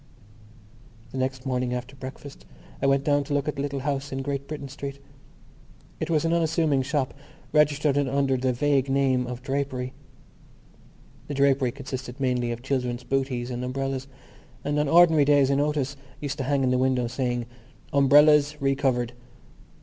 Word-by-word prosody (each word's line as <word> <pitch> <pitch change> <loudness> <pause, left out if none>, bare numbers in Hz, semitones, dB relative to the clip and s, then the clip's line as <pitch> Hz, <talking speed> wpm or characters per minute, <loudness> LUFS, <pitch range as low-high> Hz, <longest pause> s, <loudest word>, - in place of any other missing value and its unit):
The 135 - -4
next 130 0 -2
morning 125 -1 -1
after 125 +2 -6
breakfast 135 +1 -9 0.4
I 135 - +2
went 135 0 +3
down 145 0 +2
to 145 - -2
look 145 0 0
at 150 - -2
the - - -1
little 140 -1 -3
house 140 0 -2
in 135 0 -3
Great 140 0 -3
Britain 145 -2 -6
Street. 140 0 -7 1.0
It 160 - -3
was 160 -1 +2
an 165 - +2
unassuming 160 -4 +2
shop, 140 0 -1 0.4
registered 150 -1 +3
under 140 -1 +1
the 130 0 +1
vague 140 +1 +1
name 135 -2 +2
of 125 0 -6
Drapery. 135 -2 -2 1.3
The 145 - -4
drapery 135 -2 +3
consisted 130 -1 -7
mainly 125 -2 0
of 120 +1 -6
children's 125 -2 -2
bootees 130 -2 -1
and 125 0 -4
umbrellas; 135 +1 -3 0.6
and 145 +1 0
on 150 - +1
ordinary 165 -2 +6
days 140 -2 +4
a - - +3
notice 145 -1 0 0.2
used 145 0 -4
to 135 - -1
hang 140 0 +1
in 130 - +2
the 125 - +2
window, 130 -1 +2
saying: 120 -1 -2 0.5
Umbrellas 145 +1 +5
Re 135 -1 +2
covered. 125 -3 0
135 Hz, 165 wpm, -26 LUFS, 130-145 Hz, 1.3 s, ordinary